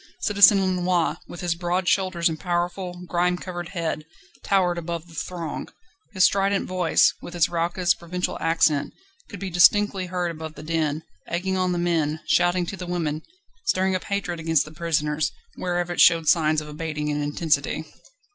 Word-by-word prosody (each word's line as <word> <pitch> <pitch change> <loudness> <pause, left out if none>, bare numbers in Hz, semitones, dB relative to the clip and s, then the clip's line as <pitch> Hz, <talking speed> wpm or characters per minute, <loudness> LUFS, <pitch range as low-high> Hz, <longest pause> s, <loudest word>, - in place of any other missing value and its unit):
Citizen 200 -1 +6
Lenoir, 180 -2 0
with 175 - -9
his 175 -2 0
broad 175 +1 -2
shoulders 185 -3 +2
and 160 -2 -3
powerful, 180 +1 -3
grime 180 +1 +1
covered 175 -2 -6
head, 165 -4 -3 0.4
towered 180 -3 +2
above 170 0 -5
the 165 - -16
throng; 165 -2 -5 0.4
his 190 -3 +2
strident 195 +1 +2
voice, 180 -2 +3
with 175 - -9
its 170 -2 +3
raucous, 175 +1 +1
provincial 180 +2 -4
accent, 160 -3 +2 0.4
could 200 - -8
be 195 -2 -5
distinctly 190 +2 +4
heard 180 -1 -2
above 160 -1 -8
the 150 - -10
din, 155 -1 -1 0.2
egging 185 +2 -2
on 185 -1 +1
the 175 - -1
men, 160 -3 0
shouting 175 0 +2
to 195 - -5
the 180 -1 -7
women, 160 -4 -2 0.5
stirring 190 - +2
up 185 - -3
hatred 200 -4 -3
against 160 -2 +2
the 155 - -11
prisoners, 155 -2 -1 0.2
wherever 175 -1 -2
it - - +2
showed 165 -2 +5
signs 155 -2 +3
of 150 - -9
abating 150 0 -4
in 150 0 -1
intensity. 145 0 0
175 Hz, 170 wpm, -24 LUFS, 160-180 Hz, 0.5 s, Citizen